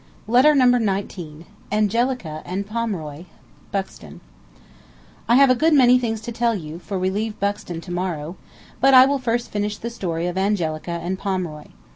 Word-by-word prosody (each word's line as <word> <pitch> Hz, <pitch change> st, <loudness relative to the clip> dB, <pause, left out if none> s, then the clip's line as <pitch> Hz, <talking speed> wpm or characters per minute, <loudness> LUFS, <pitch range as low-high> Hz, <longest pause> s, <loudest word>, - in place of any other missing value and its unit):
Letter 255 Hz, +7 st, +5 dB
Number 250 Hz, -2 st, +5 dB
Nineteen 185 Hz, -6 st, -4 dB, 0.2 s
BUXTON 205 Hz, -, -2 dB, 2.1 s
I 235 Hz, -, +6 dB
have 275 Hz, +1 st, +6 dB
a -, -, +4 dB
good 315 Hz, +4 st, +3 dB
many 250 Hz, -2 st, +6 dB
things 225 Hz, -3 st, -2 dB
to 235 Hz, +2 st, -6 dB
tell 230 Hz, 0 st, 0 dB
you, 160 Hz, -3 st, -7 dB
for 195 Hz, +2 st, -5 dB
we 185 Hz, +1 st, 0 dB
leave 215 Hz, +2 st, -3 dB
Buxton 200 Hz, -4 st, -3 dB
to 175 Hz, -, -9 dB
morrow, 175 Hz, -2 st, -3 dB, 0.4 s
but 270 Hz, 0 st, +5 dB
I 255 Hz, 0 st, +10 dB
will 280 Hz, 0 st, 0 dB
first 240 Hz, -1 st, -2 dB
finish 210 Hz, 0 st, -2 dB
the 235 Hz, -, -6 dB
story 175 Hz, -7 st, -3 dB
of 180 Hz, +1 st, -2 dB
Angelica 175 Hz, -6 st, -1 dB
and 185 Hz, +2 st, -3 dB
Pomeroy. 180 Hz, -6 st, -3 dB
205 Hz, 150 wpm, -22 LUFS, 175-240 Hz, 2.1 s, I